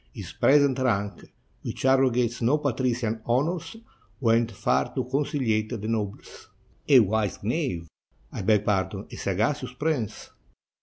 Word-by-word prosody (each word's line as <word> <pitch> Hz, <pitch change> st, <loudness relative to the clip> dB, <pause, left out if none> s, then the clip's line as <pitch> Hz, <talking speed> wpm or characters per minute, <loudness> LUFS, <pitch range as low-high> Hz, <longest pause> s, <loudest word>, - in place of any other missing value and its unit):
His -, -, -8 dB
present 140 Hz, -2 st, +4 dB
rank, 100 Hz, -7 st, -1 dB, 0.3 s
which -, -, -5 dB
arrogates 125 Hz, -3 st, +2 dB
no 125 Hz, +6 st, +3 dB
patrician 125 Hz, -5 st, -1 dB
honors, 150 Hz, -, -1 dB, 0.4 s
went 115 Hz, -2 st, +2 dB
far 95 Hz, -, +1 dB
to -, -, 0 dB
conciHate 125 Hz, -5 st, -1 dB
the 105 Hz, -, -5 dB
nobles." 105 Hz, -3 st, -4 dB, 0.4 s
"A 135 Hz, -3 st, +8 dB
wise 105 Hz, -1 st, -1 dB
knave! 110 Hz, -, -2 dB, 0.2 s
— 60 Hz, +1 st, -36 dB
I -, -, -5 dB
beg 105 Hz, +1 st, +2 dB
pardon, 100 Hz, 0 st, -1 dB
a -, -, -7 dB
sagacious 120 Hz, +7 st, -1 dB
prince! 135 Hz, -5 st, -3 dB
120 Hz, 135 wpm, -26 LUFS, 105-135 Hz, 0.4 s, A